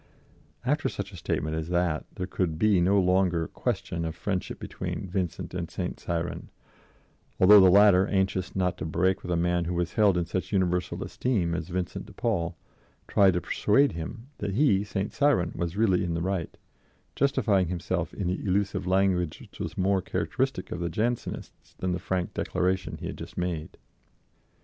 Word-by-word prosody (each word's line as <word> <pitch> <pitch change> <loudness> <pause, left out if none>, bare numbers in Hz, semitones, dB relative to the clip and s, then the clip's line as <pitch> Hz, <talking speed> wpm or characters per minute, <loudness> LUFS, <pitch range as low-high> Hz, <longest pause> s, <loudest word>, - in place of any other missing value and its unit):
After 150 +4 +1
such 100 0 -5
a - - -11
statement 80 -2 -2
as 80 +1 -3
that 85 -3 0
there 90 - -3
could 90 -3 -2
be 105 -1 +3
no 100 +3 +4
longer 90 -3 +2
question 85 - -3
of 80 -1 -3
friendship 95 -3 -3
between - - -5
Vincent 90 -2 -3
and - - -3
St. - - -4
Cyran, 85 0 -3 0.9
although 100 +3 +9
the 95 -1 +7
latter, 100 0 +6
anxious 95 -2 0
not 90 -1 0
to - - -3
break 90 +4 +1
with 90 - -8
a - - +2
man 85 0 +1
who 90 +1 -2
was 85 -1 -1
held 105 -4 +4
in 85 - 0
such 90 +2 -3
universal 90 -2 0
esteem 100 -10 -1
as 85 -2 -3
Vincent 90 0 -3
de - - -13
Paul, 95 -8 -1 0.5
tried 95 -3 +4
to 90 - 0
persuade 135 +12 +3
him 110 +9 -6
that 100 -2 -2
he, 110 -7 +3
St. 100 -1 -3
Cyran, 140 -12 +2
was 85 +2 -3
really 95 -5 +3
in 85 -2 -1
the 85 - -2
right, 95 -4 -2 0.6
justifying 105 -9 +2
himself 90 -1 -2
in 100 - -4
the 90 +2 -1
elusive 95 -1 0
language 90 -3 +1
which - - -15
was - - -5
more 95 0 +2
characteristic - - -2
of 90 - -3
the 85 0 -1
Jansenists 115 +7 -3
than 95 - -2
the 90 - -1
frank 90 0 -2
declaration 95 +1 -1
he - - -8
had - - -6
just - - -9
made. 85 -3 -3
90 Hz, 180 wpm, -27 LUFS, 85-100 Hz, 0.9 s, although